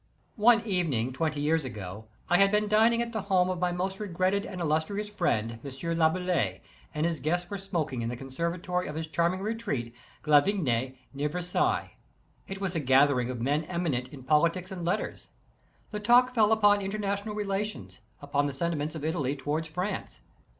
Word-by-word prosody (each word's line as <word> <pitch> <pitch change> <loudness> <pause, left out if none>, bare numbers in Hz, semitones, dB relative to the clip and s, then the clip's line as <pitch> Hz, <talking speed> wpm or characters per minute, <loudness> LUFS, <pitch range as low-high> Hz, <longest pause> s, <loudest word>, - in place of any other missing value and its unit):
One 225 +1 +5
evening, 155 - 0
twenty 150 +1 -1
years 160 +1 +2
ago, 105 -4 -7 0.2
I 175 - +4
had 195 0 +5
been 210 0 +2
dining 225 +3 +4
at 235 - -6
the 220 - -1
home 185 -2 +2
of 180 - -3
my 180 0 +1
most 190 +3 -2
regretted 190 0 0
and 185 - -7
illustrious 165 +6 0
friend, 115 - 0
M. 140 - -6 0.3
Laboulaye, 175 +2 +1 0.3
and 150 +1 +1
his 165 -3 -1
guests 175 +4 -1
were 200 - -2
smoking 160 - -2
in 115 - -2
the 120 - -4
con 135 +1 -9
servatory 175 +4 -2
of 150 - -6
his 160 0 -3
charming 170 +3 0
retreat, 200 - -3 0.3
Glavigny, 145 - +2 0.2
near 145 +2 -1
Versailles, 180 +3 -1 0.5
it 195 0 -6
was 195 -2 -2
a - - +1
gathering 130 -2 +4
of 125 -2 -4
men 145 +5 +1
eminent 160 -8 -1
in 130 0 -11
politics 170 +6 +2
and 180 -2 -5
letters. 170 - -2 0.6
The 210 - -3
talk 245 +4 +5
fell 220 -3 +4
upon 205 -2 +5
international 200 +1 -2
relations, 195 - -3 0.2
upon 145 0 +1
the 140 - -4
senti 170 +4 -1
ments 150 +2 -3
of 155 -1 -5
Italy 145 -4 -1
toward 150 +3 -2
France. 180 +6 -4
170 Hz, 180 wpm, -28 LUFS, 145-195 Hz, 0.6 s, One